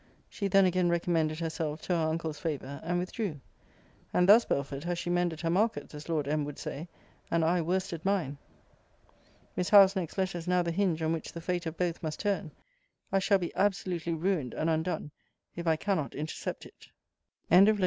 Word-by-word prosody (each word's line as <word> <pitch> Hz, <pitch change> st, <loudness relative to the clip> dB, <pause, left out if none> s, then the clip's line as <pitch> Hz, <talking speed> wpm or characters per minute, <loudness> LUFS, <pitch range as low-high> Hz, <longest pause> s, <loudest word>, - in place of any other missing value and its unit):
She 200 Hz, -, -3 dB
then 195 Hz, 0 st, +5 dB
again 180 Hz, -1 st, +2 dB
recommended 165 Hz, -2 st, +1 dB
herself 160 Hz, -2 st, -3 dB
to 180 Hz, -, -1 dB
her 165 Hz, -2 st, +1 dB
uncle's 160 Hz, -1 st, -3 dB
favour; 140 Hz, -4 st, -4 dB
and 175 Hz, +2 st, 0 dB
withdrew. 180 Hz, -2 st, -3 dB, 0.7 s
And 180 Hz, -, +3 dB
thus, 220 Hz, +4 st, +8 dB
Belford, 140 Hz, 0 st, -2 dB
has 175 Hz, 0 st, -2 dB
she 175 Hz, +1 st, -2 dB
mended 175 Hz, -2 st, 0 dB
her 165 Hz, -, 0 dB
markets, 185 Hz, -7 st, 0 dB
as 150 Hz, +2 st, -9 dB
Lord 155 Hz, -4 st, 0 dB
M. 150 Hz, +1 st, +1 dB
would 145 Hz, 0 st, -6 dB
say, 155 Hz, +5 st, -6 dB, 0.4 s
and 165 Hz, -1 st, +2 dB
I 175 Hz, +2 st, +2 dB
worsted 175 Hz, -1 st, -2 dB
mine. 175 Hz, -8 st, 0 dB, 1.2 s
Miss 180 Hz, +1 st, -1 dB
Howe's 200 Hz, -2 st, +8 dB
next 180 Hz, -2 st, -3 dB
letter 185 Hz, -2 st, 0 dB
is 165 Hz, -, -9 dB
now 180 Hz, 0 st, +3 dB
the 170 Hz, -, -1 dB
hinge 170 Hz, -3 st, 0 dB
on 160 Hz, +1 st, +1 dB
which 165 Hz, -, -4 dB
the 170 Hz, -, -6 dB
fate 175 Hz, 0 st, -2 dB
of 160 Hz, 0 st, -5 dB
both 175 Hz, -2 st, -1 dB
must 155 Hz, -2 st, -4 dB
turn. 200 Hz, -4 st, -1 dB, 0.6 s
I 195 Hz, -, +3 dB
shall 200 Hz, +1 st, +3 dB
be 175 Hz, -3 st, -4 dB
absolutely 180 Hz, -4 st, 0 dB
ruined 160 Hz, -, -1 dB
and 165 Hz, +1 st, 0 dB
undone, 160 Hz, -1 st, -1 dB, 0.4 s
if 170 Hz, 0 st, -5 dB
I 160 Hz, -, +4 dB
cannot 170 Hz, -4 st, -1 dB
intercept 155 Hz, +2 st, -4 dB
it. -, -, -16 dB, 0.6 s
END 190 Hz, +4 st, +8 dB
OF 215 Hz, -, +3 dB
VOL. -, -, -7 dB
170 Hz, 200 wpm, -30 LUFS, 160-185 Hz, 1.2 s, thus